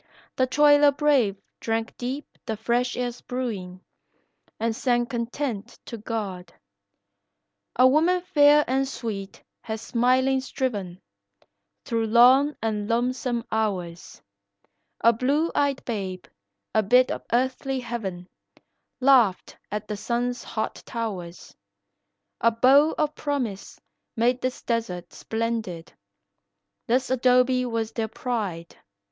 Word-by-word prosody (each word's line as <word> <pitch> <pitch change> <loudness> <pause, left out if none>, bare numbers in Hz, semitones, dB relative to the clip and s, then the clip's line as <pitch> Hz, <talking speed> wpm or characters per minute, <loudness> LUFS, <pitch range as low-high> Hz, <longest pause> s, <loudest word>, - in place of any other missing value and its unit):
The 260 - +2
toiler 290 +1 +5
brave 270 -9 +2 0.2
drank 225 0 -2
deep 260 +4 -4 0.2
the 220 -2 -2
fresh 240 +3 0
air's 245 -1 -3
brewin' 200 -8 -5 0.8
And 225 0 -1
sang 240 0 +1
content 235 -2 -4
to 230 - -7
God. 205 -5 -5 1.2
A 255 - +6
woman 330 +7 +3
fair 295 -3 +5
and 265 +2 +1
sweet 210 -7 -6 0.2
has 220 -1 -5
smilin' 255 +3 +2
striven 205 -9 -3 0.9
Through 230 -1 -1
long 255 +6 +5
and 210 -2 -2
lonesome 240 0 0
hours; 185 -6 -3 0.8
A 230 - +5
blue 280 +8 +1
eyed 285 -2 0
babe, 190 -6 -4 0.5
a 220 - +4
bit 250 +5 +4
of - - -4
earthly 260 +2 0
heaven, 200 -7 -5 0.7
Laughed 250 -8 +3 0.2
at 210 0 -4
the 210 - -4
sun's 245 +3 -2
hot 220 -1 -4
towers; 190 -7 -6 0.8
A 230 - +4
bow 265 +7 +4
of 305 -1 0
promise 260 -11 -4 0.4
made 245 +2 +1
this 255 0 -3
desert 225 -7 -3
splendid, 220 -7 -4 0.9
This 255 +3 +1
'dobe 250 0 +4
was 225 -1 -2
their 225 -1 -2
pride. 205 -9 -4
235 Hz, 115 wpm, -25 LUFS, 220-260 Hz, 1.2 s, A